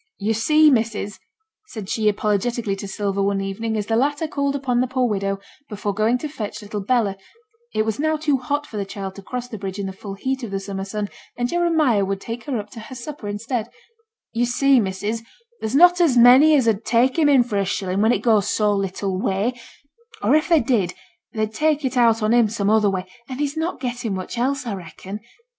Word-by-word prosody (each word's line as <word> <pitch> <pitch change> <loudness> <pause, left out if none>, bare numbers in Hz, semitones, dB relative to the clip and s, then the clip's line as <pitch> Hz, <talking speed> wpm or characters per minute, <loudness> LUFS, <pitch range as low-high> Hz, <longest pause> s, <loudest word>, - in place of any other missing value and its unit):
'Yo' 210 +2 0
see, 305 +7 +5
missus,' 220 -4 -1 0.5
said 215 - -7
she, 215 +1 +1
apologetically, 210 +1 0
to 195 +1 -7
Sylvia, 200 0 -2
one 200 0 +1
evening, 215 +3 -3
as 210 - -2
the 225 - 0
latter 290 +6 +1
called 280 -2 -1
upon 255 -3 0
the 255 - +1
poor 255 0 +1
widow 195 -2 -1 0.3
before 205 -1 -3
going 215 +4 +2
to 305 - -4
fetch 220 -7 -6
little 205 0 -5
Bella 210 -2 +1 0.6
(it 215 - +2
was 220 +1 -2
now 315 +1 +1
too 300 -2 +1
hot 285 +4 -2
for 220 - -8
the 200 - -1
child 195 -1 -6
to 200 - -10
cross 250 +5 -5
the 220 -4 -8
bridge 195 0 -5
in 200 - -3
the 190 - -5
full 195 +1 -8
heat 265 +6 -2
of 235 - -5
the 195 0 -2
summer 195 0 -5
sun, 205 +1 -3 0.3
and 245 0 -1
Jeremiah 320 - +2
would 195 0 -2
take 230 +3 -7
her 275 -4 -2
up 210 -1 -6
to - - -9
her 240 +4 -9
supper 255 -2 -7
instead) 220 +3 -3 0.7
'Yo' 240 +1 +1
see, 270 +2 +4
missus, 205 +2 -2 0.4
there's 220 +4 -3
not 355 +3 +6
a 345 - +6
many 260 +6 +8
as 260 -5 +3
'ud 220 -1 +1
take 245 +7 +2
him 300 -2 +4
in 270 -4 +6
for 225 -4 -3
a - - +2
shillin' 190 0 -1
when 220 +2 +4
it - - 0
goes 215 -4 +3
so 210 -1 +2
little 195 -1 -2
way; 200 +6 0 0.7
or - - +3
if 310 +4 +3
they 330 -3 +5
did, 220 -8 0 0.4
they'd 215 -1 -2
take 300 +2 +1
it 260 0 -1
out 230 -2 +4
on 215 +2 +3
him 235 -3 +4
some 205 -1 0
other 215 -2 +4
way, 190 -1 -2 0.2
an' 255 - -5
he's 290 +1 -2
not 320 +2 -2
getten 245 -5 -3
much 185 +4 -5
else, 265 +1 0
a 225 -4 -3
reckon. 185 +3 -8
225 Hz, 225 wpm, -22 LUFS, 200-260 Hz, 0.7 s, many